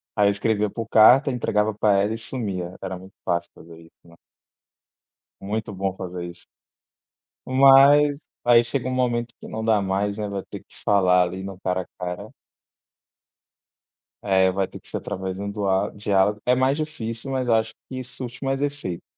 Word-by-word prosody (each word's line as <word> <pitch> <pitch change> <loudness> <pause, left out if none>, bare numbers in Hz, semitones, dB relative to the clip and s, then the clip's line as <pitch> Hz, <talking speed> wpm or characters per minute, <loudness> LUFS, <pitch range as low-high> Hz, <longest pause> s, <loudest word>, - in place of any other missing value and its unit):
Aí, 105 -1 +4
eu - - +4
escrevia 105 +1 0
por 115 +2 -6
carta, 125 +6 +6
entregava 110 -3 0
pra 105 -1 +2
ela 105 +2 0
e - - -4
sumia. 100 -7 -5
Era 95 -1 -5
muito 95 +1 -15
fácil 85 0 -1
fazer 80 0 -14
isso, 80 - -18
né. 85 0 -18 1.3
Muito 105 +2 -3
bom 95 0 -2
fazer 90 -1 -6
isso. 85 0 -11 1.0
Mas, 140 +2 +6 0.2
aí, 120 -1 +6
chega 125 +1 -3
um - - -2
momento 120 -2 -1
que - - -10
não 110 0 -5
dá 110 -2 +3
mais, 100 +2 -1
né. 105 - -3
Vai 100 -1 -4
ter - - -7
que - - -23
falar 90 -3 +4
ali 90 +2 -5
no 95 -1 -8
cara 95 0 -1
a - - -11 0.2
cara. 90 +4 -5 1.9
É 95 -2 +3
vai 95 0 -1
ter - - -11
que - - -22
ser - - -4
através 95 0 -5
de 100 - -5
um 100 - -4
dua 100 -1 0
diálogo. 105 0 +1
É 125 - +4
mais 130 +2 +2
difícil, 135 -5 -5
mas 130 -1 -1
acho 110 -1 +1 0.2
que 130 -1 -5
surte 125 +1 -8
mais 135 0 -1
efeito 145 -12 -3
105 Hz, 180 wpm, -23 LUFS, 95-125 Hz, 1.9 s, carta